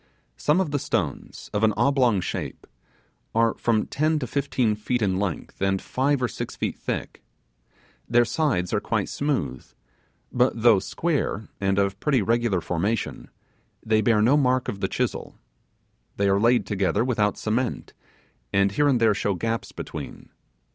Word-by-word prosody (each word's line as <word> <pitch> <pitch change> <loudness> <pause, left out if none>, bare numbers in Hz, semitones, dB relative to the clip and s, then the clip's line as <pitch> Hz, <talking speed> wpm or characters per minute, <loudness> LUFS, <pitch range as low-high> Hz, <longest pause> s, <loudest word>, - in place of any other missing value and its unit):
Some 150 +5 +2
of 180 -6 0
the 145 - 0
stones, 90 - -3
of 105 - 0
an 110 -1 +4
oblong 125 -8 +3
shape, - - -5 0.7
are 115 0 +3
from 110 -2 +1
ten 155 +2 0
to 140 - -2
fifteen 130 -3 0
feet 105 +4 -2
in 95 -2 +1
length, 95 -3 -4
and 95 0 +1
five 135 +4 0
or - - +3
six - - -6
feet - - -2
thick. - - -4 0.9
Their 120 +1 +4
sides 115 - 0
are 105 - +2
quite 105 -2 -1
smooth, 100 - -2 0.7
but 125 -1 +2
though 115 -3 +6
square, 145 - -2
and 95 0 +1
of 100 0 0
pretty 135 -5 +2
regular 115 -4 +1
formation, 95 +7 -2 0.6
they 110 -1 +3
bear 110 -1 +3
no 130 +6 +5
mark 130 -2 +2
of 100 - -4
the - - 0
chisel. - - -3 0.8
They 100 - +2
are 100 0 +3
laid 120 +3 +3
together 100 +2 0
without 105 -5 +1
cement, 115 +3 -2 0.6
and 100 0 +3
here 145 +9 +2
and 130 -4 +3
there 110 -2 +4
show 100 -1 -1
gaps 115 +5 -3
between. - - -8
115 Hz, 160 wpm, -25 LUFS, 100-130 Hz, 0.9 s, though